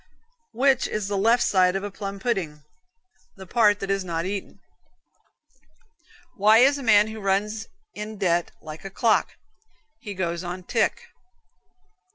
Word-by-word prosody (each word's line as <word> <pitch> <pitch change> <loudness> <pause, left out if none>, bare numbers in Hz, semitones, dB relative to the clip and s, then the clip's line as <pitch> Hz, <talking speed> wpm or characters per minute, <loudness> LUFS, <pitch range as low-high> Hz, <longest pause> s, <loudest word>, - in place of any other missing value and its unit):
Which 265 0 +3
is 210 -2 -3
the 205 - -1
left 230 +5 +3
side 185 -1 +3
of 195 - -2
a 205 - -5
plum 200 0 -6
pudding? 180 -10 -3 0.7
The 190 - -11
part 210 +1 +3
that 195 0 -2
is 195 -1 0
not 170 -1 -3
eaten. 195 +1 -5 1.8
Why 215 +2 +5
is 275 +4 +5
a - - -6
man 210 -3 +4
who 220 0 -7
runs 210 +3 -1 0.3
in 215 +1 -7
debt 175 -3 +1
like 155 0 -9
a 195 - -6
clock? 220 +3 +1 0.7
He 205 -2 -8
goes 170 -1 -3
on 180 +1 -6
tick. 220 +4 0
200 Hz, 150 wpm, -24 LUFS, 185-220 Hz, 1.8 s, Why